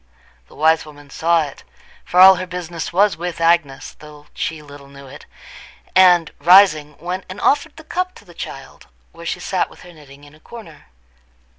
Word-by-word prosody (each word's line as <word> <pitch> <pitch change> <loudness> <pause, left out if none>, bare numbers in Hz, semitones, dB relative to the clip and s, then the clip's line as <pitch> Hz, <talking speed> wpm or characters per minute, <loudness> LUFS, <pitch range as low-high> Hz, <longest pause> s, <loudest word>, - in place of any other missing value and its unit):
The - - -19
wise 160 +1 +2
woman 145 -2 -16
saw 165 +1 +1
it, 140 -2 -10 0.4
for 180 - -1
all 190 0 +9
her 185 +1 -5
business 175 -2 -6
was 200 +3 +2
with 175 0 -6
Agnes 165 -5 0
though 150 -1 -15
she 160 -1 -4
little 145 -1 -14
knew 140 0 -14
it, 135 +2 -14 0.7
and, 180 -3 +5
rising, 165 -5 +4
went 180 +2 -5
and 185 +2 -9
offered 295 +6 0
the 320 - -12
cup 365 +3 -4
to - - -17
the - - -16
child, - - -10 0.2
where - - -11
she - - -3
sat - - -2
with - - -18
her 175 - -14
knitting 145 -2 -17
in 145 0 -17
a 155 - -20
corner. 165 -5 -14
165 Hz, 185 wpm, -18 LUFS, 150-185 Hz, 0.7 s, all